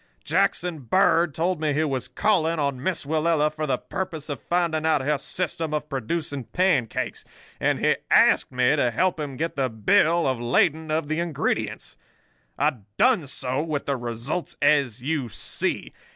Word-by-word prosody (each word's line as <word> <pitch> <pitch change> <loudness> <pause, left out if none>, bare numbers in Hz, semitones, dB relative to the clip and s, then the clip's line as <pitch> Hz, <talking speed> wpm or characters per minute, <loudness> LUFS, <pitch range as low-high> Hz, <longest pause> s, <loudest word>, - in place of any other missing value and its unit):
Jackson 175 -3 0
Bird 170 - +3
told 170 0 0
me 150 -2 +1
he 155 +3 +1
was 135 -6 -2
calling 170 -6 +1
on 140 -4 -1
Miss 175 0 -2
Willella 155 0 +1
for 155 0 -3
the 135 - +1
purpose 165 -5 -5
of 140 -6 -4
finding 170 -1 0
out 155 -3 +2
her 145 +2 0
system 160 0 -2
of 150 0 -4
producing 140 0 -3
pancakes, 180 - 0 0.4
and - - +1
he - - +3
asked - - +4
me 125 +3 +3
to 125 -5 +2
help 175 +9 0
him 140 -3 -5
get 165 +2 -2
the 135 -2 0
bill 155 +10 +3
of 130 -3 0
lading 155 +6 +1
of 155 -1 0
the 155 +2 -1
ingredients. 170 -4 -2 0.6
I 145 -1 +1 0.2
done 225 - +3
so, 130 0 -3
with 155 -3 -3
the 140 - 0
results 120 +7 -4
as 140 -5 +2
you 140 -4 -1
see. - - -2
150 Hz, 165 wpm, -24 LUFS, 135-165 Hz, 0.6 s, asked